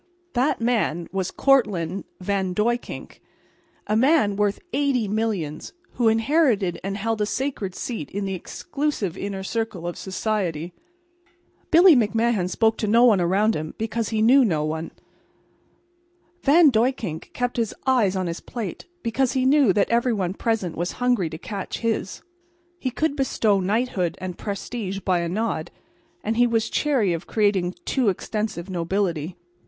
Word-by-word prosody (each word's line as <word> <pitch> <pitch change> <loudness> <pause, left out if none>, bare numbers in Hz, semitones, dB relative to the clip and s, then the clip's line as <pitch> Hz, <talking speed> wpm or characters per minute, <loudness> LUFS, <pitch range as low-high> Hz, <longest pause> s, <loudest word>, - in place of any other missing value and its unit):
That 260 +4 +1
man 205 -8 0
was 190 -1 -1
Cortlandt 200 - +1
Van 190 -1 -1
Duyckink, 240 +4 -2 0.7
a 215 - 0
man 255 -4 +3
worth 205 0 0
eighty 270 -5 +1
millions, 200 -8 -2 0.2
who 240 -2 +1
inherited 225 - +2
and 195 +1 -3
held 225 +1 -1
a 210 - +1
sacred 235 -7 -3
seat 225 - -5
in 200 0 -3
the 195 - -2
exclusive 215 - -3
inner 195 -1 -4
circle 215 -4 -3
of 175 - -4
society. 185 -5 -2 1.0
Billy 340 0 +7
McMahan 225 -4 +1
spoke 220 +3 +2
to 215 - -1
no 230 +4 +5
one 210 -6 +5
around 200 +6 +2
him, 155 +1 -5
because 225 0 -2
he 220 -1 +1
knew 260 +4 +6
no 160 -9 +1
one. 160 +1 -3 1.5
Van 300 +1 +6
Duyckink 225 - -1
kept 245 0 -2
his 230 -3 -1
eyes 240 -8 +3
on 185 -1 -1
his 170 0 -3
plate 220 - -6 0.2
because 250 +2 0
he 260 -1 +1
knew 275 -5 +5
that 200 +3 +1
every 235 +1 +2
one 185 -4 -1
present 210 -6 -1
was 175 +2 -2
hungry 245 -9 +1
to 160 - -7
catch 195 +2 -5
his. 225 -4 -2 0.6
He 260 - -1
could 285 +4 -1
bestow 225 -7 +1
knighthood 195 -2 0
and 185 -1 -5
prestige 200 0 -4
by 185 -2 +1
a 170 0 -2
nod, 185 -4 -2 0.5
and 220 +2 -1
he 245 0 +5
was 225 -1 0
chary 255 -12 +1
of 165 +1 -5
creating 205 -4 +2
a - - -3
too 255 -6 +2
extensive 205 -2 -3
nobility. 175 -2 -2
210 Hz, 155 wpm, -24 LUFS, 185-240 Hz, 1.5 s, Billy